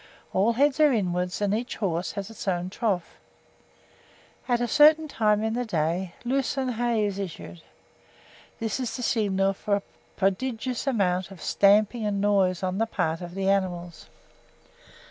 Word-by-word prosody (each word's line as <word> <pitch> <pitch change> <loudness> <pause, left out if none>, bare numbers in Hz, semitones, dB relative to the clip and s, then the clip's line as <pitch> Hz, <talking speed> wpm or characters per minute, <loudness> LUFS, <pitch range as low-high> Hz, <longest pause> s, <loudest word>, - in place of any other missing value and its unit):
All 205 +5 +3
heads 280 +4 +2
are 300 -2 +6
inwards, 180 -4 -1
and 205 -1 +1
each 235 +3 -2
horse 180 -4 -2
has 200 0 -5
his 225 -2 -9
own 180 -1 -1
trough. 195 -5 -2 1.3
At 240 -2 +2
a 240 - 0
certain 305 +4 +5
time 215 -5 +1
in 220 0 0
the 245 +1 -1
day 175 -2 -2
lucerne 265 +1 0
hay 235 -2 0
is 200 -1 -3
issued. 150 - -7 1.0
This 225 +3 -2
is 250 -3 -3
the 250 - -5
signal 195 -4 +1
for 200 +1 -1
a 200 - -3 0.3
prodigious 240 +6 -1
amount 185 -7 +1
of 195 -3 -12
stamping 210 +6 +3
and 205 -1 -1
noise 195 -3 +2
on 185 +1 -1
the 225 - +1
part 165 -6 -1
of 175 0 -8
the 195 0 -1
animals. 175 -3 -1
205 Hz, 160 wpm, -26 LUFS, 185-235 Hz, 1.3 s, are